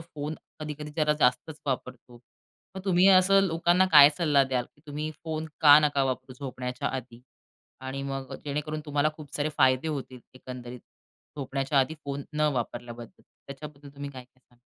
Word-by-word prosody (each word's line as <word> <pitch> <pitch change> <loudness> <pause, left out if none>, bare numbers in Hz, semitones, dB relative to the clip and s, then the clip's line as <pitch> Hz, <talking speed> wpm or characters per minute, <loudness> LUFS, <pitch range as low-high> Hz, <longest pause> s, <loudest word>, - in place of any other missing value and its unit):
Phone 155 -2 -6 0.3
कधी-कधी 150 0 -6
जरा 150 -1 +3
जास्तच 125 +5 +1
वापरतो. 125 -2 -5 0.6
मग 190 - -4
तुम्ही 185 -1 +4
असं 195 +1 +6
लोकांना 175 +2 +3
काय 145 -1 +10
सल्ला 150 -5 +4
द्याल, 130 -2 -1
की 145 - -27
तुम्ही 150 +1 -4
फोन 160 -1 -3
का 145 -1 +9
नका 145 -2 +2
वापरू 130 0 -3
झोपण्याच्या 125 -2 -4
आधी 120 -2 -7 0.7
आणि 135 +1 -4
मग 135 -1 -5
जेणेकरून 150 +2 -3
तुम्हाला 145 0 +1
खूप 145 -3 -12
सारे 145 +1 0
फायदे 130 +3 +3
होतील 135 -4 -5
एकंदरीत 125 -1 -9 0.6
झोपण्याच्या 135 0 -1
आधी 135 +4 +1
फोन 140 0 -4
न 150 - -3
वापरल्याबद्दल. 120 -1 -6 0.2
त्याच्याबद्दल 145 +1 -10
तुम्ही 140 0 -6
काय 130 -2 -10
काय 130 +1 -34
सांगाल? 120 -1 -30
140 Hz, 160 wpm, -27 LUFS, 130-155 Hz, 0.7 s, काय